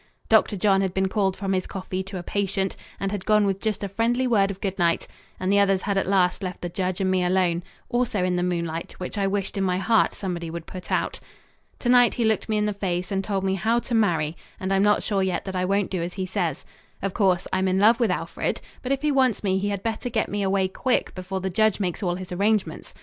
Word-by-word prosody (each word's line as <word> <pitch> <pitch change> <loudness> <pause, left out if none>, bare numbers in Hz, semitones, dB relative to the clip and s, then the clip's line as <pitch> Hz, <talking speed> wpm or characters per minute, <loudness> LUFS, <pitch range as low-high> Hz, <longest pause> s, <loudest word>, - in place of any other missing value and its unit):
Dr. 205 - +4
John 195 0 +3
had 190 -2 -1
been 190 0 +2
called 190 -2 0
from 195 -2 -1
his 185 -1 -1
coffee 190 -1 -4
to 195 0 -6
a 175 - -5
patient 195 0 -1 0.2
and 195 0 -2
had 205 -3 -3
gone 210 -1 +4
with 195 -1 -1
just 215 -2 -2
a - - -1
friendly 230 +6 +1
word 205 -5 +3
of 195 -1 -5
good 195 -1 -3
night, 170 -1 +2 0.3
and 185 +2 +1
the 200 - +5
others 195 -2 +3
had 200 -1 0
at 195 - +1
last 190 -1 +2
left 185 -2 -5
the 175 - -2
judge 185 +1 -2
and 190 -1 +1
me 185 -1 +2
alone 180 -1 +2 0.3
also 240 -6 0
in 180 0 +1
the 175 - 0
moonlight, 170 -2 -2
which 180 - -6
I 200 -1 +1
wished 195 0 -2
in - - +1
my 180 -1 +1
heart 225 +3 +2
somebody 175 -4 -4
would 165 0 -6
put 185 -1 -9
out. - - 0 0.6
To - - -4
night 245 -1 +5
he 235 - +1
looked 220 0 +1
me 215 - +1
in 210 - +1
the 210 - 0
face 185 -1 -2
and 195 0 0
told 195 -1 -1
me 190 0 +1
how 220 +5 +1
to 240 +1 -3
marry, 170 -8 +2 0.2
and 190 +1 -1
I'm 195 - +3
not 210 +1 +3
sure 200 -2 0
yet 190 -1 -1
that 190 -1 -5
I 180 0 0
won't 200 +1 0
do 185 -3 -1
as 175 +1 -4
he 190 -1 -2
says. 180 -6 -2 0.4
Of 195 -1 -1
course 190 -4 +2
I'm 190 0 +2
in 185 0 +2
love 220 +4 +5
with 235 -3 +2
Alfred, 180 - -2 0.2
but 255 - -3
if 275 +1 0
he 300 - +3
wants 260 -6 +2
me 190 -1 +1
he 205 +1 -1
had 200 -1 -3
better 225 +2 -2
get 220 -2 0
me 205 0 -2
away 190 -1 +2
quick 250 +7 0
before 190 +1 -4
the 190 0 -2
judge 215 +2 +2
makes 180 -2 -2
all 175 -3 0
his 185 0 -8
arrangements. 205 +3 0
195 Hz, 260 wpm, -25 LUFS, 185-210 Hz, 0.6 s, the